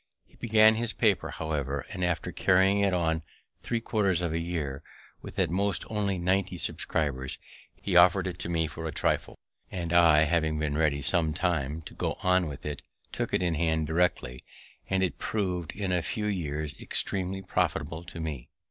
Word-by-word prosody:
He - - -31
began 110 -1 +5
his 115 -1 -1
paper, 105 -5 +2
however, 70 -3 -3
and, 95 -3 -4
after 90 -3 -1
carrying 95 +2 +3
it 100 -1 +3
on 80 -3 +1 0.4
three 115 +7 -1
quarters 100 -6 0
of 85 -2 -1
a 85 - 0
year, 80 -5 -3 0.4
with - - -10
at - - +1
most 100 0 0
only 100 -3 0
ninety 90 +1 0
subscribers, 70 -6 -1 0.4
he 95 - -3
offered 90 +2 +6
it 90 -1 -4
to - - -4
me 80 -1 +1
for 80 +1 -6
a - - -3
trifle; - - 0 0.3
and 85 -2 -4
I, 85 -3 +6
having 80 -1 +1
been 75 -1 -1
ready 75 -3 +1
some 80 -2 +1
time 80 -3 -1
to - - -10
go - - -2
on 90 -2 +3
with 70 -2 -8
it, 75 -2 -4 0.3
took - - -3
it - - +1
in 85 -2 +1
hand 80 0 +1
directly; 80 -6 0 0.5
and 95 0 +2
it 90 - -2
prov'd 90 -6 -2
in 100 -2 -2
a 90 -1 +2
few 105 +5 -2
years 75 -7 -2
extremely 95 0 -1
profitable 80 -3 -1
to 85 - -9
me. 75 -6 -5
85 Hz, 185 wpm, -28 LUFS, 80-95 Hz, 0.5 s, offered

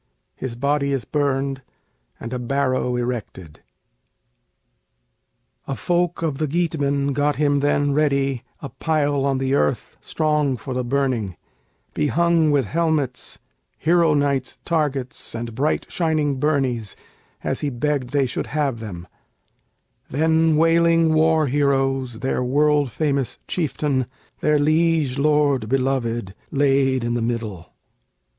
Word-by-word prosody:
His 130 -3 -5
body 140 +2 0
is 130 -5 -2
burned, 135 -1 -1 0.6
and 115 +2 -6
a 125 - -2
barrow 130 0 0
erected.] 120 -10 -5 2.1
A 135 - -2
folk 175 +1 0
of 150 -4 -1
the 155 - 0
Geatmen 140 -3 0
got 145 +1 +1
him 145 -1 +2
then 145 0 +1
ready 140 -4 +1 0.2
A 140 - -5
pile 145 0 0
on 135 -1 +1
the 135 0 -1
earth 75 - 0
strong 150 -4 0
for 130 +3 -6
the 125 0 -1
burning, 120 -7 -1 0.6
Behung 165 +1 +2
with 140 -4 +2
helmets, 155 - -1 0.4
hero 165 -1 +3
knight's 140 -3 0
targets, 145 -8 -2
And 115 0 -5
bright 140 +7 0
shining 155 -5 0
burnies, 130 -7 0 0.5
as - - -1
he 145 - -1
begged 135 0 -1
they 140 0 +2
should 125 - -3
have 140 -5 -1
them; 90 -5 -7 1.0
Then 160 +2 +2
wailing 165 0 +4
war 160 0 +3
heroes 135 -3 0
their 130 -1 0
world 145 +2 +2
famous 140 -2 -1
chieftain, 145 -6 -1 0.3
Their 150 0 +2
liege 155 -2 +2
lord 145 -6 +2
beloved, 120 -6 -1 0.2
laid 135 -2 +2
in 120 0 -1
the 120 - -1
middle. 115 -7 -4
140 Hz, 125 wpm, -22 LUFS, 130-150 Hz, 2.1 s, wailing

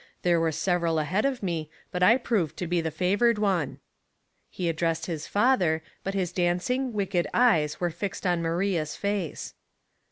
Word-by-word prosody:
There 175 -1 +3
were 165 -1 +1
several 170 0 0
ahead 155 - 0
of 265 -5 -1
me, 165 -4 -2 0.2
but 180 - -3
I 225 +7 +6
proved 220 - -1
to 180 - -3
be 175 0 0
the 160 - -2
fa 180 +4 0
vored 235 +1 +3
one." 190 -8 0 0.7
He 180 - -3
addressed 165 0 0
his 160 -4 -4
father, 195 -9 +2 0.2
but 195 +1 -3
his 180 -3 -1
dancing, 185 +10 0
wicked 195 -4 0
eyes 165 -12 +3
were 175 -1 0
fixed 195 +4 -5
on 175 -2 +2
Maria's 165 -1 -1
face. 200 -5 -3
180 Hz, 170 wpm, -27 LUFS, 165-200 Hz, 0.7 s, I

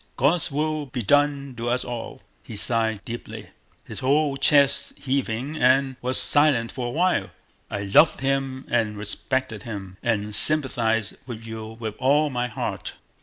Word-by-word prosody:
God's 155 +6 +2
will 155 +1 -2
be 125 -2 -4
done 140 +3 +2
to 120 +1 -3
us 125 +1 0
all!" 120 -2 -7 0.2
He 110 - -10
sighed 110 -1 +1
deeply, 120 +1 -8 0.3
his - - -8
whole 140 +2 +2
chest 140 0 +3
heaving, 135 +1 -2
and 130 0 +3
was 130 +1 +1
silent 145 -6 +4
for 125 -2 -4
a - - -3
while. 175 +8 +1 0.4
"I 100 0 -4
loved 100 +11 +4
him 135 -1 -1
and 110 -3 0
respected 110 +2 -2
him, 100 -4 -8
and 105 -3 -1
sympathize 115 -6 +2
with 115 -2 -8
you 110 0 -8
with 110 -2 -4
all 145 +3 +2
my 125 -1 -1
heart." 110 - -5
125 Hz, 155 wpm, -24 LUFS, 110-140 Hz, 0.4 s, silent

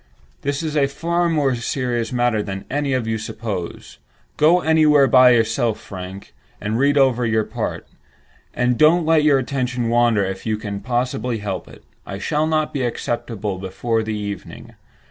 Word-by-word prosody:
This 140 +2 -2
is 155 -1 -3
a 140 -2 +3
far 170 +5 -1
more 145 -5 +1
serious 120 -1 -2
matter 120 -3 +1
than 95 -1 -6
any 145 -1 0
of 130 -3 0
you 110 0 -2
suppose. 105 -5 -6 0.4
Go 170 +4 +4
somewhere 155 -3 +5
by 130 0 +6
yourself, 115 -1 +1
Frank, 95 0 -9 0.3
and 110 +2 -2
read 145 +1 +3
over 130 -3 +3
your 110 -1 +1
part, - - -4 0.7
and 125 -1 0
don't 160 +2 +5
let 160 -1 +4
your 150 -2 +5
attention 125 -2 -2
wander 120 -4 +3
if 95 0 -5
you 110 -1 -1
can 100 -2 -5
possibly 125 0 -2
help 100 -3 -5
it. - - -15 0.2
I 100 - -7
shall 150 +9 0
not 155 -1 0
be 135 - -1
accessible 115 -4 -3
before 110 +5 -2
the 110 -1 -3
evening. 100 -2 -7
120 Hz, 165 wpm, -21 LUFS, 110-140 Hz, 0.7 s, by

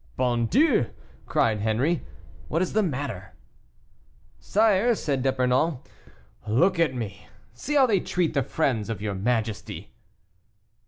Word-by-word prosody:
"Bon 120 -2 +1
Dieu!" 260 - +3 0.4
cried 110 -2 +1
Henri, 120 +11 0 0.4
"what 165 - 0
is 185 - -4
the 215 - +3
matter?" 125 - -4 1.0
"Sire," 220 +2 +3
said 140 -9 -2
D'Epernon, 130 +3 +1 0.7
"look 170 - +2
at 155 -6 +2
me; 100 -5 -6 0.3
see 295 - -4
how 275 -2 +6
they 210 -6 +2
treat 175 -2 -1
the 140 - +2
friends 125 -6 -1
of 115 - -3
your 105 -1 -3
majesty." 110 +1 -2
130 Hz, 125 wpm, -25 LUFS, 115-180 Hz, 1.0 s, how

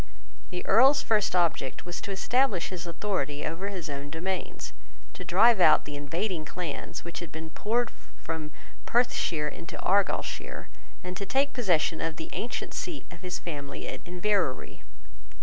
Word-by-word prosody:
The 180 0 -4
Earl's 270 +7 +6
first 210 -4 +2
object 165 -6 +1
was 175 0 -5
to - - -6
establish 205 0 +2
his 175 -2 -5
authority 165 -5 -1
over 165 +5 -2
his 185 -4 -4
own 140 0 -5
domains, 180 +4 -3 0.4
to - - -7
drive 195 +4 +6
out 155 - +7
the 150 - -5
invading 165 +5 -1
clans 165 -1 -5
which 170 - -5
had 170 - -7
been 160 0 -7
poured 230 +6 +1 0.3
from 160 -2 -4 0.4
Perthshire 175 -10 +2
into 170 +4 -6
Argyleshire, 200 +2 0 0.3
and 180 0 -4
to 200 - -3
take 275 +7 +2
possession 175 -9 +2
of 165 -1 -1
the 160 - -7
ancient 235 - -3
seat 340 -5 -4
of 175 -1 -11
his 180 -1 -3
family 145 -4 -5
at - - -5
Inverary. 180 -5 0
180 Hz, 155 wpm, -29 LUFS, 160-205 Hz, 0.4 s, out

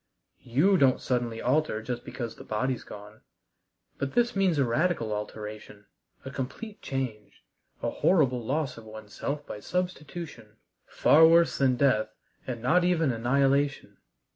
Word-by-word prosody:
You 160 +12 +3
don't 130 -2 +4
suddenly 120 -3 -2
alter 135 -2 +1
just 120 +1 -4
because 120 -3 -6
the - - -11
body's 125 +4 -2
gone. 105 +1 -12 0.8
But 140 -1 -3
this 240 -2 +2
means 190 -5 +2
a 140 - +3
radical 120 -3 0
alteration, 105 0 -7 0.4
a 135 - -6
complete 170 - -6
change, 125 -6 -5 0.4
a - - 0
horrible 130 -9 +2
loss 135 0 -2
of - - -13
oneself 110 +7 -6
by 105 - -7
substitution 150 - -5 0.3
far 160 +2 +6
worse 170 +1 +4
than 130 -2 +3
death, 125 -5 +1 0.3
and 120 -3 -5
not 175 +8 +3
even 165 -5 +2
annihilation. 135 +4 +1
130 Hz, 140 wpm, -28 LUFS, 115-155 Hz, 0.8 s, far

